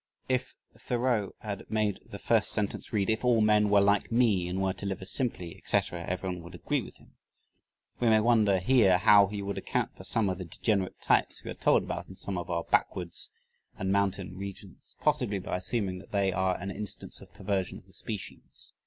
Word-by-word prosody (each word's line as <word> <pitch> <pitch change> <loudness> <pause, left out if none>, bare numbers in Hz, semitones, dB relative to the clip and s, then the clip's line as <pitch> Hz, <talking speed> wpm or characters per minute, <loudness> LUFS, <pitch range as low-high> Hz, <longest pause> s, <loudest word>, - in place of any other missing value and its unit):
If 130 0 -1 0.2
Thoreau 120 -5 -1
had 100 -2 -6
made 105 -2 0
the - - -9
first - - +2
sentence 100 -2 -2
read: 100 -3 +1
"If 110 +1 0
all 120 -2 +4
men 105 -1 +4
were 100 0 +5
like 100 +2 +2
me 110 -7 +3
and 90 +2 -2
were 95 -1 +1
to 95 +1 -7
live 95 - -3
as 95 - -4
simply," 100 -10 -2
etc., 85 -1 -1
everyone 90 -1 -3
would 85 +2 -11
agree 85 - -1
with - - -11
him. - - -23 0.8
We 120 - +3
may 110 -1 +6
wonder 110 -3 +4
here 95 -1 +4
how 100 +1 +6
he 100 0 -5
would 100 0 -3
account - - -2
for - - -11
some 110 -3 +1
of 95 -1 -2
the 90 - -5
degenerate 95 +2 -1
types - - +1
we - - -5
are - - -3
told - - +3
about - - -5
in 95 - -11
some 95 -1 -4
of 85 - -7
our 85 -1 -1
backwoods 85 -2 0 0.5
and 95 0 -1
mountain 95 -2 0
regions. 100 0 -9
Possibly 125 -9 +1
by 90 -1 -3
assuming 95 -1 -1
that - - -15
they 100 -2 +1
are 95 0 +1
an 100 +2 -5
instance 105 +1 -6
of - - -14
perversion 95 -3 -2
of - - -16
the 95 - -18
species. 105 -3 -6
100 Hz, 205 wpm, -29 LUFS, 95-110 Hz, 0.8 s, may